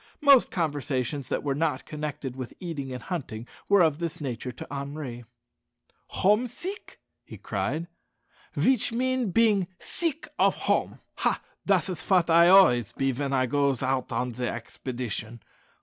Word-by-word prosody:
Most 280 Hz, -4 st, +6 dB
conversations 145 Hz, -5 st, -2 dB
that -, -, -1 dB
were 140 Hz, -2 st, 0 dB
not 150 Hz, -2 st, -1 dB
connected 150 Hz, -4 st, -5 dB
with 130 Hz, -2 st, -7 dB
eating 150 Hz, -7 st, -5 dB
and 125 Hz, -2 st, -6 dB
hunting 125 Hz, -, -5 dB, 0.2 s
were 200 Hz, -3 st, +6 dB
of 155 Hz, -2 st, +2 dB
this 170 Hz, -2 st, -3 dB
nature 125 Hz, -3 st, -4 dB
to 130 Hz, -, -9 dB
Henri. 140 Hz, -4 st, -6 dB, 0.8 s
"Hom' 210 Hz, +6 st, +2 dB
sik," 370 Hz, -, -7 dB, 0.2 s
he -, -, -11 dB
cried, 165 Hz, +2 st, -2 dB, 0.7 s
"veech 255 Hz, -4 st, +3 dB
mean 255 Hz, -1 st, 0 dB
bein' 205 Hz, -2 st, +3 dB
sik 330 Hz, -2 st, -1 dB
of -, -, +4 dB
hom'! -, -, 0 dB, 0.2 s
Hah! -, -, +1 dB, 0.3 s
dat -, -, +3 dB
is 185 Hz, -3 st, -4 dB
fat 180 Hz, -3 st, +2 dB
I 170 Hz, +1 st, +7 dB
am 180 Hz, +2 st, +8 dB
always 120 Hz, -, +5 dB
be, 135 Hz, 0 st, 0 dB
ven 135 Hz, +2 st, -3 dB
I 130 Hz, -1 st, +2 dB
goes 140 Hz, 0 st, +1 dB
hout 130 Hz, -1 st, -1 dB
on 125 Hz, 0 st, -1 dB
de 120 Hz, +1 st, -3 dB
expedition. 120 Hz, -1 st, -5 dB
145 Hz, 155 wpm, -27 LUFS, 130-185 Hz, 0.8 s, am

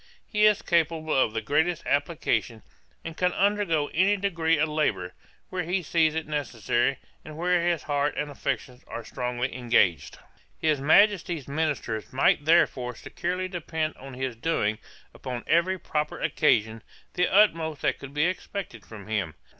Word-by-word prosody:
'He 210 Hz, 0 st, +3 dB
is 210 Hz, -1 st, +2 dB
capable 160 Hz, -2 st, +1 dB
of 130 Hz, -4 st, +3 dB
the 115 Hz, 0 st, -3 dB
greatest 160 Hz, +7 st, 0 dB
application, 135 Hz, -7 st, -1 dB, 0.4 s
and 165 Hz, -1 st, -6 dB
can 180 Hz, +1 st, +1 dB
undergo 200 Hz, -7 st, +1 dB
any 190 Hz, +5 st, +3 dB
degree 165 Hz, -5 st, +1 dB
of 155 Hz, +1 st, +2 dB
labour, 150 Hz, -13 st, -1 dB, 0.4 s
where 185 Hz, -, -2 dB
he 180 Hz, +2 st, -1 dB
sees 160 Hz, 0 st, +2 dB
it 160 Hz, -, -2 dB
necessary, 135 Hz, -3 st, -1 dB, 0.3 s
and 155 Hz, 0 st, -10 dB
where 180 Hz, +1 st, +2 dB
his 170 Hz, -4 st, 0 dB
heart 145 Hz, 0 st, 0 dB
and 150 Hz, 0 st, -2 dB
affections 130 Hz, -2 st, -4 dB
are 115 Hz, -, -7 dB
strongly 125 Hz, +1 st, -3 dB
engaged. 115 Hz, -, +1 dB, 0.4 s
His 155 Hz, -3 st, +1 dB
Majesty's 175 Hz, -1 st, +3 dB
ministers 140 Hz, -7 st, -2 dB
might 135 Hz, +2 st, +2 dB
therefore 130 Hz, -7 st, +3 dB
securely 180 Hz, +9 st, -3 dB
depend 160 Hz, -3 st, -3 dB
on 135 Hz, -1 st, -10 dB
his 130 Hz, -1 st, -3 dB
doing, 115 Hz, -5 st, -1 dB, 0.3 s
upon 125 Hz, -2 st, -6 dB
every 170 Hz, +3 st, +2 dB
proper 150 Hz, -3 st, -3 dB
occasion, 110 Hz, -6 st, +1 dB, 0.3 s
the 180 Hz, -, +1 dB
utmost 165 Hz, -7 st, +3 dB
that -, -, +1 dB
could 140 Hz, +1 st, -10 dB
be 150 Hz, +2 st, +3 dB
expected 185 Hz, -, -4 dB
from 105 Hz, -3 st, -11 dB
him. 100 Hz, -8 st, -2 dB
155 Hz, 155 wpm, -26 LUFS, 125-170 Hz, 0.4 s, He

